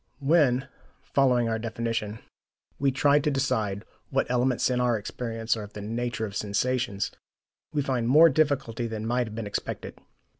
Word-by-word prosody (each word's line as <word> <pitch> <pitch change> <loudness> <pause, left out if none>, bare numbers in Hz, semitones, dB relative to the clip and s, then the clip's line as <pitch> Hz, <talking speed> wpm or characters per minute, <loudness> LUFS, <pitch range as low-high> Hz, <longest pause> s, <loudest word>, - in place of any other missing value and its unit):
When, 140 -3 +3 0.4
following 125 -4 +2
our 110 0 -1
definition, 115 -2 -3 0.6
we 140 -1 +3
try 140 +2 +4
to 150 - 0
decide 110 -8 -1 0.2
what - - +1
elements 125 0 +2
in 125 0 +1
our 120 -2 +2
experience 115 +1 -2
are 110 - -5
of 105 0 -9
the 105 - -7
nature 115 +1 -2
of 100 -2 -8
sensations, 105 0 -1 0.6
we 145 -2 0
find 125 -4 -1
more 155 +6 +8
difficulty 135 -6 +1
than 110 -1 -5
might 120 +1 0
have 110 - -8
been 115 -1 -4
expected. 100 - -5
120 Hz, 160 wpm, -27 LUFS, 110-135 Hz, 0.6 s, more